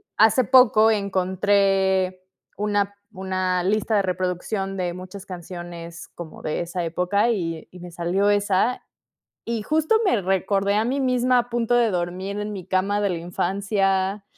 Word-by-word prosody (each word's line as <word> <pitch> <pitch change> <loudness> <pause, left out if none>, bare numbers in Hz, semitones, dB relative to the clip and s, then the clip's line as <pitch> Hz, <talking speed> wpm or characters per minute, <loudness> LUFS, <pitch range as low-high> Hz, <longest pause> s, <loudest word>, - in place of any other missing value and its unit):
hace 225 +3 +4
poco 225 -3 +6
encontré 190 -1 +1 0.4
una 205 -1 0 0.2
una 185 -2 -1
lista 215 +3 +1
de 200 - +4
reproducción 185 +2 -2
de 180 -1 -1
muchas 185 +2 -9
canciones 175 -2 -8
como 170 -2 -9
de 155 - -2
esa 175 +1 -3
época, 180 +7 +1
y 165 -6 -3
y 180 - -14
me 175 -1 -9
salió 180 +4 0
esa. 205 +3 +1 0.7
Y 230 -2 -1
justo 310 - +1
me 240 - +2
recordé 195 +2 +1
a 215 +2 +2
mí 265 +4 -1
misma 255 -1 +2
a 240 0 -1
punto 240 0 0
de 230 -4 +3
dormir 185 +3 -3
en 210 0 -4
mi 185 -3 -7
cama 195 +2 0
de 200 -2 +1
la 170 - -2
infancia. 195 +2 -1
195 Hz, 155 wpm, -23 LUFS, 180-210 Hz, 0.7 s, poco